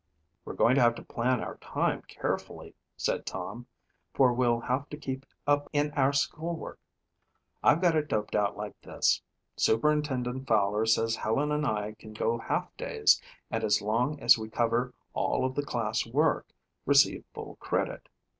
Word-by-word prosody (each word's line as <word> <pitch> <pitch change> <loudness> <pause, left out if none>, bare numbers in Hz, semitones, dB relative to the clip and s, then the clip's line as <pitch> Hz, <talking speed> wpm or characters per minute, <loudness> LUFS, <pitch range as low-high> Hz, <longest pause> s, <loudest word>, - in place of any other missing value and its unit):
"We're - - -6
going 120 - +4
to 135 - +4
have 120 -1 +4
to - - -9
plan 125 +1 0
our - - -6
time - - -1
carefully," - - -4 0.2
said - - -1
Tom, 120 +1 -6 0.5
"for 130 -2 +5
we'll 120 -1 +2
have 130 +4 -2
to 150 - -7
keep 135 -2 -5 0.2
up 145 0 +2
in 145 0 +1
our 140 -1 +2
school 160 +4 -1
work. 160 - -8 0.8
I've 165 - +4
got 175 -3 +4
it 150 -1 +1
doped 105 -5 -2
out 105 -1 +1
like 105 0 -7
this. - - +1 0.4
Superintendent 130 0 +1
Fowler 105 0 +2
says 115 0 +2
Helen 140 +7 0
and 150 0 0
I 105 -2 -1
can 110 - -11
go 115 +2 0
half - - -2
days - - +3 0.3
and 115 0 -1
as 105 -1 +3
long 125 +8 0
as 120 -3 +6
we 110 0 -6
cover 120 +2 0 0.2
all - - 0
of 130 - -1
the 145 - 0
class 115 -6 -1
work, 150 +7 +1 0.4
receive - - +4
full - - -8
credit. - - -2
125 Hz, 170 wpm, -29 LUFS, 115-145 Hz, 0.8 s, as